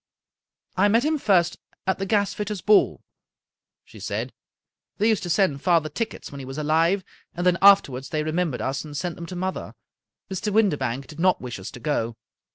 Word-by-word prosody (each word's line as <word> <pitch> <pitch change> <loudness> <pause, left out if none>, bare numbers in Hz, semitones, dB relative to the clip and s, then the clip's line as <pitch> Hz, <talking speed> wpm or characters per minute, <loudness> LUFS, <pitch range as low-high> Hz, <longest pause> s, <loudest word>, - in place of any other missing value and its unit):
" - - -50
I - - +6
met 230 +6 +3
him 310 0 +1
first 175 -6 +2 0.3
at 190 - 0
the 195 - -2
gasfitters' 205 -2 -1
ball," 210 - +4 0.8
she - - -14
said. - - -4 0.3
" - - -61
They 215 - +2
used 220 -3 +2
to 175 - -5
send 170 -6 +2
father 165 -3 +2
tickets 225 +9 -5
when 140 - -8
he 135 - -7
was 135 +2 -7
alive, 165 +5 +2 0.3
and 175 +1 -2
then 180 -1 +3
afterwards 140 -10 +5
they 155 -1 -1
remem 165 +2 0
bered - - -6
us, 135 +1 -2
and 150 -2 -7
sent 175 0 -3
them 170 - -8
to 185 - -7
mother. 185 +1 -4 0.5
Mr. 195 +2 -3
Windibank 140 - +1
did 150 +4 -12
not 185 +1 +3
wish 120 -4 -6
us 95 - -7
to - - -11
go. 115 -4 -2
175 Hz, 200 wpm, -24 LUFS, 145-200 Hz, 0.8 s, I